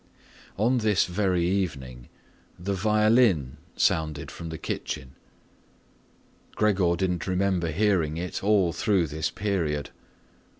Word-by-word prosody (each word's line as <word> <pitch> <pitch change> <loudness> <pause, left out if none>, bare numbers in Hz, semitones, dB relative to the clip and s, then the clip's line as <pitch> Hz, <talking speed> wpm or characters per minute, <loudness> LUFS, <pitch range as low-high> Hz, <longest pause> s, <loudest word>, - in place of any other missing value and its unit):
On 120 +5 +2
this 105 -3 +2
very 90 -2 0
evening 70 -11 -3 0.5
the 100 +3 -3
violin 105 - +3 0.2
sounded 75 -2 0
from 85 - -7
the 80 - -5
kitchen. 65 -3 -5 1.4
Gregor 95 -5 +2
didn't 90 -2 -2
remember 95 -2 0
hearing 85 -3 +1
it 90 +2 -4
all 100 -5 +3
through 95 -5 +1
this 80 +1 -2
period. 85 -8 -2
90 Hz, 110 wpm, -26 LUFS, 80-100 Hz, 1.4 s, violin